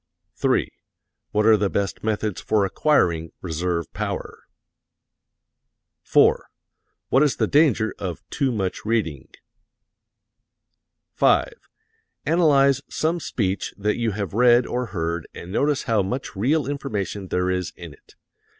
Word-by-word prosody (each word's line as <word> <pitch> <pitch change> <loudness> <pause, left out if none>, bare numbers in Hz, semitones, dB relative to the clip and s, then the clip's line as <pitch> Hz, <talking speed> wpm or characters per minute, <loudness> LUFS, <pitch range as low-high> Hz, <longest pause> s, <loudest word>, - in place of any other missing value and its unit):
3. - - +1 0.6
What 105 0 +1
are 110 0 +7
the 100 -1 0
best 100 -1 -2
methods 110 -2 -2
for 105 -2 +1
acquiring 85 - +1
reserve 85 0 -3
power? - - -5 1.6
4. - - +3 0.6
What 135 - +4
is 145 -5 +3
the - - +1
danger 140 -8 +3
of 90 -4 -6
too 140 -3 0
much 95 -5 -3
reading? 90 - -1 1.9
5. - - +3 0.7
Analyze 140 -4 +4
some 165 +2 -1
speech 100 - -2
that 105 +1 0
you 115 -1 0
have 100 -3 -4
read 120 +2 +5
or 125 0 -2
heard 85 -4 -3
and 85 - -9
notice 145 +5 +1
how 115 -5 +1
much 125 +8 -4
real 135 +9 +1
information 105 -9 -4
there 90 0 0
is 90 -2 -2
in - - -10
it. - - -22
105 Hz, 125 wpm, -23 LUFS, 95-135 Hz, 1.9 s, are